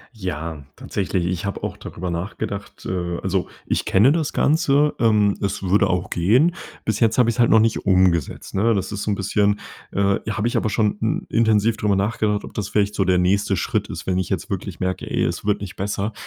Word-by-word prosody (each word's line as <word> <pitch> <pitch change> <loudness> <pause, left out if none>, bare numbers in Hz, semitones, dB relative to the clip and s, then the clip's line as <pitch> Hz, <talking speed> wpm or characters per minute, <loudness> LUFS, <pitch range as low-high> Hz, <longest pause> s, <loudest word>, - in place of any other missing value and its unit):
Ja, 80 -6 -5
tatsächlich, 95 -2 -2
ich 90 -1 -2
habe 100 - -4
auch - - -3
darüber 90 0 -6
nachgedacht. 100 +3 -5
Äh, 85 -1 -2
also - - 0 0.2
ich - - 0
kenne 110 +8 +4
das 155 -2 0
Ganze. 150 -1 +2
Ähm, 105 -3 +3
es 100 0 -2
würde 100 +2 +3
auch 90 -1 -1
gehen. 120 - +3 0.3
Bis 110 -1 0
jetzt 115 -2 +2
habe 120 -2 +4
ich's 120 - -7
halt 120 - +5
noch 110 - +6
nicht 110 -1 +1
umgesetzt, 90 -5 +2
ne? 110 +4 +2
Das 95 - -2
ist 100 0 -4
so - - -2
'n 105 - +1
bisschen 100 +1 +1 0.3
äh, 100 0 +1
habe 105 +1 -1
ich 120 - -2
aber 110 - +1
schon 105 0 0 0.3
i - - -5
intensiv 110 -1 +3
drüber 105 -2 +1
nachgedacht, 105 +1 0
ob - - -10
das 100 -2 -3
vielleicht 105 -1 +1
so 95 - 0
der 90 0 +3
nächste 95 +2 +2
Schritt 85 - -1
ist, - - -6
wenn 95 -1 0
ich 95 - -2
jetzt - - -3
wirklich - - -4
merke, 95 0 -3
ey, - - 0
es - - -2
wird 105 -1 +1
nicht 95 -2 -7
besser. 100 +2 -2
100 Hz, 220 wpm, -22 LUFS, 95-110 Hz, 0.3 s, noch